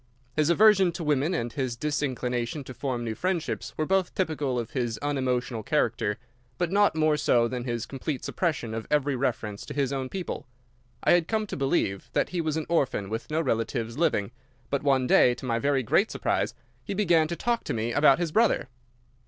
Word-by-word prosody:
His 155 0 +2
aversion 195 0 +5
to 170 0 -5
women 150 +3 +1
and 120 -7 -3
his 130 -4 -2
disinclination 130 -2 -2
to 130 - -9
form 125 -3 -3
new 115 -2 -2
friendships 180 +5 -2
were 155 - 0
both 190 +1 +1
typical 150 -8 -1
of 115 -2 -3
his 120 -4 -2
unemotional 130 -4 -1
character, 110 -5 0 0.4
but 175 -1 -1
not 205 -4 +3
more 155 -1 +3
so 120 -5 +3
than 125 0 -4
his 120 -2 -2
complete 135 +1 -4
suppression 150 -10 -1
of 115 0 -5
every 145 -2 +2
reference 115 -5 -2
to - - -7
his 140 -2 0
own 130 -1 -3
people. 185 -6 -5 0.6
I - - +4
had 175 -2 +4
come 220 -1 0
to - - -6
believe 135 - 0
that - - +1
he 180 -2 -1
was 155 -1 -1
an 160 - -2
orphan 130 - 0
with 110 +1 -4
no 155 +1 +1
relatives 115 -3 -1
living, 120 -9 +1 0.4
but 140 - +1
one 135 -3 +2
day, 125 0 +5
to 130 - -9
my 115 -2 0
very 140 0 +1
great 195 - +2
surprise, - - -1 0.3
he 200 - -4
began 170 -6 +3
to 170 - -3
talk 235 +5 -1
to - - -2
me 115 +1 -1
about 145 0 +5
his 170 -2 -2
brother. 220 - +2
140 Hz, 200 wpm, -27 LUFS, 120-165 Hz, 0.6 s, aversion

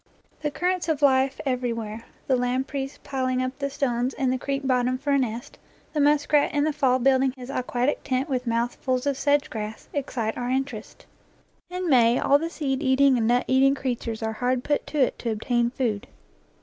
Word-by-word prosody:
The 300 - 0
currents 360 +3 -1
of 300 -2 0
life 265 0 +3
everywhere, 230 -4 -2 0.2
the 265 - +2
lampreys 265 +3 -2
piling 255 -2 -1
up 255 +1 -3
the 280 -1 -1
stones 255 -2 -1
in 260 -2 0
the 260 - 0
creek 275 +1 -3
bot 250 -2 +2
tom 255 0 0
for 285 +2 -2
a 280 - +4
nest, 240 -2 -4 0.3
the 305 - -1
muskrat 295 0 +3
in 290 - +3
the 310 0 +1
fall 260 -3 +2
building 260 0 +3
his 255 +1 -8
aquatic 250 +1 -1
tent 260 +1 -1
with 255 -3 -2
mouthfuls 245 +3 -1
of 280 -1 +1
sedge 285 +1 +1
grass, 215 0 -6
excite 250 -6 -2
our 245 0 -2
interest. 270 +2 -4 0.6
In 360 0 -3
May 240 -4 +5
all 285 +1 +4
the 330 +2 -3
seed 275 -5 -2
eating 270 -1 +4
and 225 -2 +1
nut 245 +1 +2
eating 270 +1 +4
creatures 235 -4 -3
are 220 0 -1
hard 250 +2 0
put 290 - -1
to 305 - -5
it 265 -3 +2
to 235 - -3
obtain 235 +2 0
food. 235 -5 -2
260 Hz, 195 wpm, -25 LUFS, 245-280 Hz, 0.6 s, May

